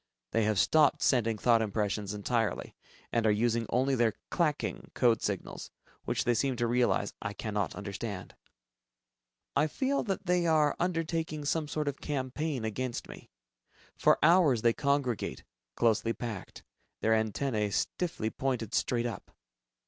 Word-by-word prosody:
They 115 -1 +2
have 110 -1 +1
stopped 150 - +4
sending 115 -4 +2
thought 115 +1 +4
impressions 105 -1 -1
entirely, 115 +2 -1 0.4
and 115 -1 +2
are - - +5
using 115 +1 +1
only 130 +3 +2
their 115 -4 +2 0.2
"clacking" 155 -4 -1
code 120 -3 +3
signals, 100 -3 -4 0.4
which - - 0
they 120 - +2
seem 130 +3 0
to 120 0 0
realize 120 -4 +1
I 105 -2 -3
cannot 105 -3 -2
understand. 100 -1 -6 1.2
I 150 +2 +3
feel 270 - 0
that 195 -2 -3
they 180 -1 +2
are 155 -2 +3
undertaking 165 -3 -1
some 155 +1 0
sort 150 0 -2
of 140 -1 -3
campaign 140 -2 -2
against 120 +3 -3
me. - - -12 0.7
For - - +4
hours 155 -8 +5
they 115 -1 +5
congregate, 140 -4 -1 0.3
closely 115 0 +2
packed, 115 -6 -7 0.4
their 110 - +3
antennae 110 0 0
stiffly 110 - -2
pointed 125 -5 -2
straight 120 0 +1
up. 120 - -5
120 Hz, 140 wpm, -30 LUFS, 110-150 Hz, 1.2 s, are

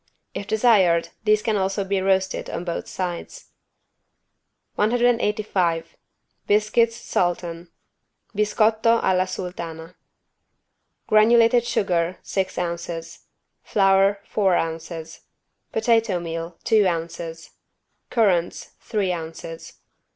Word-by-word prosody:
If 200 - -6
desired 195 -8 +3 0.2
these 215 0 +3
can 220 - +1
also 195 +1 0
be 195 0 -1
roasted 190 0 0
on - - -4
both 170 -1 -4
sides. 180 -2 -6 1.2
185 210 -7 +1 0.5
BISCUITS 215 +2 +3
SULTAN 175 -5 -2 0.7
(Biscotto 220 +2 +3
alla 185 0 +2
sultana) 170 -2 -6 1.1
Granulated 230 +2 +5
sugar, 175 -2 0
six 190 -1 -2
ounces. 170 -1 -5 0.3
Flour, 195 0 +3
four 195 -4 +1
ounces. 165 0 -4 0.5
Potato 225 -4 +2
meal, 165 0 -5
two 215 -3 +4
ounces. 165 -1 -4 0.6
Currants, 190 -8 +1
three 205 -4 -1
ounces. 165 -1 -7
190 Hz, 90 wpm, -23 LUFS, 170-215 Hz, 1.2 s, Granulated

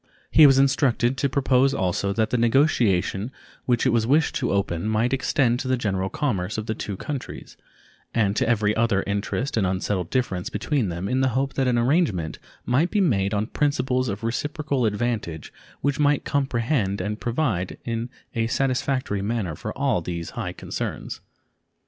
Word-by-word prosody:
He 155 -2 +8
was 135 -1 +5
instructed 135 -2 +2
to 140 +1 +1
propose 135 0 +2
also 95 +2 0
that 110 +2 0
the - - +1
negotiation 115 - +2 0.3
which 120 -1 +1
it 130 - +4
was 115 -1 +1
wished 150 +4 +3
to - - -1
open 100 -2 -1
might 110 +4 +1
extend 125 -2 +1
to 135 - -4
the 130 0 +2
general 95 -5 -1
commerce 105 -8 -2
of 110 - -3
the 110 - -1
two 100 -2 -5
countries, 140 +3 -6 0.6
and 105 -3 +1
to 115 - +1
every 105 -2 +2
other 110 -3 +2
interest 100 +6 -2
and 100 -4 +2
unsettled 95 -1 -1
difference 95 -9 -1
between 135 -10 -1
them 85 +3 -4
in 130 +5 +1
the 130 - +3
hope 135 0 0
that 135 -2 0
an 125 -1 +2
arrangement 120 - +1 0.3
might 140 +8 +2
be 210 - 0
made 100 - +2
on 105 0 0
principles 130 -2 0
of 100 +2 -5
reciprocal 140 +1 -1
advantage 105 -7 -3 0.3
which 140 +1 0
might 145 -1 +2
comprehend 120 -6 0
and 105 +3 -3
provide 120 - -1
in 115 +1 -3 0.2
a 115 -1 0
satisfactory 130 -4 0
manner 100 -5 -2
for 105 - -5
all 135 -9 +1
these 85 0 -5
high - - -4
concerns. - - -5
115 Hz, 175 wpm, -24 LUFS, 100-135 Hz, 0.6 s, He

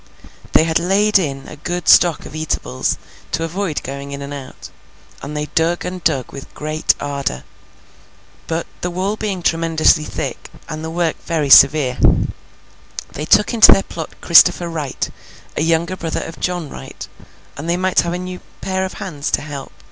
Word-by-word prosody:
They - - +6
had 160 0 +1
laid 200 +4 +3
in 135 -6 -4
a 150 - -10
good 175 +3 -4
stock 170 -3 +5
of - - -10
eatables, 150 - -2 0.4
to 165 - 0
avoid 170 -1 -3
going 140 +1 -6
in 140 0 -6
and 140 +1 -7
out, 135 -2 -9 0.5
and 150 +2 -6
they 150 - -1
dug 165 +2 +1
and 180 -1 -5
dug 135 -6 0
with 140 - -10
great 155 +1 0
ardour. 140 - -3 1.0
But, 165 0 -2 0.2
the 180 - -1
wall 185 +4 -2
being 200 -5 -3
tremendously 165 -1 +3
thick, - - -5 0.2
and 155 +1 -6
the 160 - -4
work 165 -1 -1
very 155 -4 0
severe, 135 -2 +6 1.1
they 150 - -5
took 210 +8 +4
into 225 -2 +8
their 195 - +5
plot 160 -2 -7
Christopher 175 0 +6
Wright, 150 -5 -3 0.5
a - - -1
younger 165 +3 +1
brother 165 -3 -3
of 165 - -9
John 175 -3 -2
Wright, - - -9 0.5
that 145 +3 -7
they 170 +1 +1
might 185 0 +2
have 170 0 -3
a - - -2
new 180 0 -6 0.2
pair 190 0 -1
of 190 - -6
hands 155 -8 -5
to - - 0
help. 145 -3 -7
165 Hz, 175 wpm, -18 LUFS, 145-180 Hz, 1.1 s, into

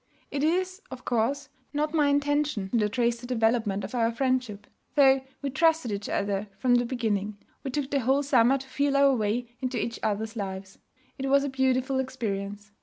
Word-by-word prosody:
It 285 0 -1
is, 370 +4 0
of 255 - -9
course, 245 +4 0 0.2
not 300 +2 -1
my 300 -3 +3
intention 285 -7 +1
to 210 -2 +2
trace 235 +1 0
the 245 - -8
development 225 -4 +1
of - - -6
our 230 -2 +2
friendship. 250 -4 -1 0.3
Though 270 -2 +6 0.2
we 280 - -1
trusted 320 -4 +2
each 200 0 -4
other 200 +1 -1
from 250 +3 +2
the 245 0 +3
beginning, 215 -4 -2 0.3
we 275 - -3
took 275 +1 -3
the 280 - +2
whole 270 +3 +2
summer 265 -1 +4
to 265 0 -10
feel 280 +1 +1
our 275 -1 +5
way 235 +2 -1
into 255 -1 -2
each 230 +1 -3
other's 215 +2 -2
lives. 190 -2 -6 0.4
It 270 0 -2
was 280 0 +4
a 285 - -1
beautiful 265 0 +1
experience. 205 -5 -4
250 Hz, 185 wpm, -27 LUFS, 220-275 Hz, 0.4 s, Though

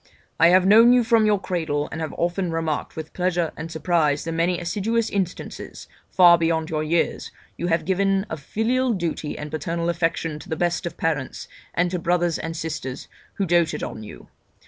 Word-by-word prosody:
I 165 - +7
have 185 +1 +5
known 225 +5 +7
you 250 -1 +4
from 225 -2 +3
your 205 -2 +3
cradle, 160 -6 -2
and 160 - -5
have 160 - -4
often 175 +1 -1
marked 165 -2 -2
with 160 0 -7
pleasure 175 -2 0
and 165 +2 -7
surprise 160 -3 +1
the 165 - -4
many 170 +2 0
assiduous 215 +6 -1
instances 190 -3 -4 0.2
(far 175 -2 +6
beyond 165 -1 0
your 155 -1 -1
years) 165 +2 0 0.3
you 175 - -3
have 165 -1 +1
given 195 +1 +1
of 160 - -5
filial 240 - 0
duty 170 -5 -3
and 150 0 -7
paternal 165 +2 -2
affection 165 -2 -1
to - - -13
the 160 - -1
best 175 +1 -1
of 170 - -8
parents, 150 -5 -2 0.3
and 175 0 +1
to 180 - -1
brothers 175 0 +1
and 165 +1 -5
sisters 150 -5 -5 0.3
who 195 - -1
doated 170 -2 +1
on 110 - -5
you. 65 - -11
170 Hz, 190 wpm, -23 LUFS, 160-185 Hz, 0.3 s, I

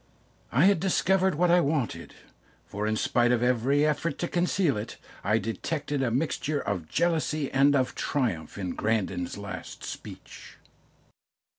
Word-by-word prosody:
I 140 +8 +4
had 200 -3 +4
discovered 190 0 +2
what 175 +2 +3
I 175 - +6
wanted, 145 -5 -2 0.5
for 105 +1 -3
in 110 - +1
spite 120 0 +2
of 120 -1 +2
every 125 +4 +2
effort 155 0 -1
to 175 - -2
conceal 175 -3 +1
it, 105 +2 -6 0.3
I 105 +3 +2
detected 140 - -3
a 130 - +1
mixture 145 +3 -1
of 90 - -3
jealousy 155 -3 0
and 140 +2 +4
of 130 -2 +1
triumph 105 - -2
in 95 -3 -3
Grandon's 95 -5 -1
last 100 -1 -8
speech. - - -9
135 Hz, 145 wpm, -27 LUFS, 110-160 Hz, 0.5 s, I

